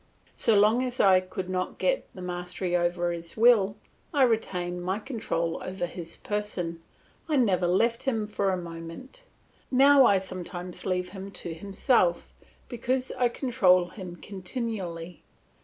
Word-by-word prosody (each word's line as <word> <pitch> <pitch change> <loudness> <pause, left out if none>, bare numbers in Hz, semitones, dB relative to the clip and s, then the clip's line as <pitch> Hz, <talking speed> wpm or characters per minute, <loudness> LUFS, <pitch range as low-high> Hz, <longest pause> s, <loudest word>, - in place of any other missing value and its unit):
So 225 - +3
long 215 +4 +5
as 250 -1 -4
I 190 -2 +6
could 185 0 -6
not 185 0 -2
get - - 0
the 185 - -8
mastery 180 0 -3
over 175 0 +1
his 170 +2 -6
will, 215 -4 +5 0.4
I 285 -5 +3
retained 180 -7 0
my 190 +2 -1
control 210 -9 -3
over 185 -1 -3
his 170 -1 -7
person; 185 -5 -3 0.5
I 305 - +2
never 195 -9 +3
left 230 +6 +2
him 225 -5 0
for 205 -2 -1
a 185 - 0
moment. 170 - -9 0.4
Now 275 0 +7
I 200 - +5
sometimes 180 -1 -6
leave 180 -1 -1
him 195 0 -8
to 170 - -4
himself 190 0 +1 0.3
because 255 +1 -2
I 250 -2 +1
control 195 -9 +3
him 180 -2 -8
continually. 180 - -5
190 Hz, 145 wpm, -27 LUFS, 175-230 Hz, 0.5 s, Now